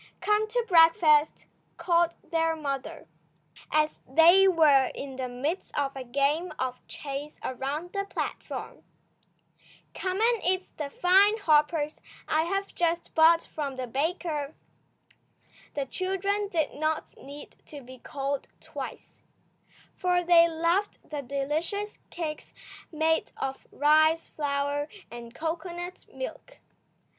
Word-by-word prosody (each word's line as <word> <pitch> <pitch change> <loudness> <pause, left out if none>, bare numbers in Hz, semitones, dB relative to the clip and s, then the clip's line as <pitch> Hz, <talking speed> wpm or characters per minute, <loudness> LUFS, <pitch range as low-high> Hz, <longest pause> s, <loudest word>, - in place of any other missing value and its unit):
"Come 420 +1 +2
to 475 +1 -1
breakfast," 325 -4 +5 0.3
called 340 0 +2 0.2
their 325 -1 +1
mother, 275 - -5 0.6
as 305 0 +1
they 340 +7 +7
were 300 -7 +5
in 275 -1 -6
the 260 -1 -3
midst 280 +9 -4
of 275 -1 -1
a 265 - -5
game 280 +7 0
of 255 -1 -3
chase 285 +1 -6
around 280 +7 -4
the 395 -1 -1
platform. - - -5 1.1
"Come 375 +1 -3
and 460 -1 +2
eat 370 +1 +1
the 295 -2 -4
fine 390 +7 +4
hoppers 305 -4 +2 0.3
I 315 +1 +2
have 390 +3 -2
just 340 0 -1
bought 330 +1 +5
from 285 -3 -5
the 255 -1 -4
baker." 300 +2 -2 1.2
The 280 -1 -1
children 385 +6 -1
did 320 -6 0
not 310 +1 -2
need 285 +2 -11
to 290 -2 -9
be 255 0 -13
called 275 +2 -4
twice, - - -9 0.7
for 360 -1 +1
they 340 -1 +6
loved 335 +5 0
the 295 -1 -3
delicious 300 - -3
cakes 310 -3 -6 0.4
made 320 0 +1
of 270 0 -5
rice 310 +2 +3
flour 285 0 -1 0.2
and 235 0 -10
cocoanut 345 +2 -5
milk. - - -8
315 Hz, 120 wpm, -28 LUFS, 280-355 Hz, 1.2 s, they